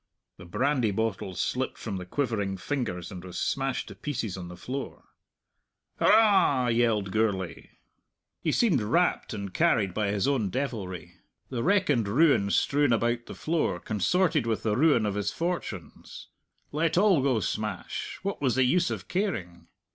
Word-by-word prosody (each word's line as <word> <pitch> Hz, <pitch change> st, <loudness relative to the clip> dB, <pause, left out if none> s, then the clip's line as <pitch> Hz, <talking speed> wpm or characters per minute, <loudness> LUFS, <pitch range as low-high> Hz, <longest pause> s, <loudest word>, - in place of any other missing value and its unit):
The -, -, -11 dB
brandy 125 Hz, +5 st, +1 dB
bottle 100 Hz, -3 st, -2 dB
slipped 130 Hz, +9 st, -2 dB
from 100 Hz, -4 st, -5 dB
the 90 Hz, -1 st, -7 dB
quivering 105 Hz, -6 st, -1 dB
fingers 105 Hz, -, -3 dB
and 90 Hz, -2 st, -8 dB
was 90 Hz, -1 st, -8 dB
smashed 135 Hz, -1 st, -1 dB
to -, -, -8 dB
pieces 125 Hz, -9 st, -4 dB
on 90 Hz, -2 st, -7 dB
the 90 Hz, 0 st, -10 dB
floor. 135 Hz, +2 st, -6 dB, 1.0 s
"Hurrah!" 190 Hz, -, +4 dB
yelled 115 Hz, -4 st, +1 dB
Gourlay. 95 Hz, -6 st, -1 dB, 0.7 s
He -, -, 0 dB
seemed 190 Hz, -, +3 dB
rapt 170 Hz, +13 st, +1 dB
and 100 Hz, -2 st, -5 dB
carried 115 Hz, -, +2 dB
by 105 Hz, 0 st, 0 dB
his 100 Hz, +4 st, 0 dB
own 125 Hz, -8 st, +1 dB
devilry. 95 Hz, -, -4 dB, 0.3 s
The 120 Hz, -3 st, -2 dB
wreck 200 Hz, +6 st, +2 dB
and 115 Hz, -7 st, +1 dB
ruin 125 Hz, -3 st, +3 dB
strewn 145 Hz, +6 st, +2 dB
about 120 Hz, +1 st, 0 dB
the -, -, -8 dB
floor 155 Hz, -, -1 dB
consorted 150 Hz, -, +1 dB
with 110 Hz, -2 st, -1 dB
the 105 Hz, -2 st, +1 dB
ruin 135 Hz, -4 st, +4 dB
of 105 Hz, -, -1 dB
his 105 Hz, 0 st, -1 dB
fortunes; 165 Hz, -, -5 dB, 0.4 s
let 160 Hz, +3 st, 0 dB
all 190 Hz, -6 st, +5 dB
go 130 Hz, -4 st, +2 dB
smash 105 Hz, 0 st, -4 dB
what 200 Hz, -4 st, -3 dB
was 130 Hz, -5 st, +1 dB
the 130 Hz, -, +4 dB
use 175 Hz, +8 st, +2 dB
of -, -, -5 dB
caring? 125 Hz, -, -3 dB
115 Hz, 160 wpm, -27 LUFS, 100-145 Hz, 1.0 s, all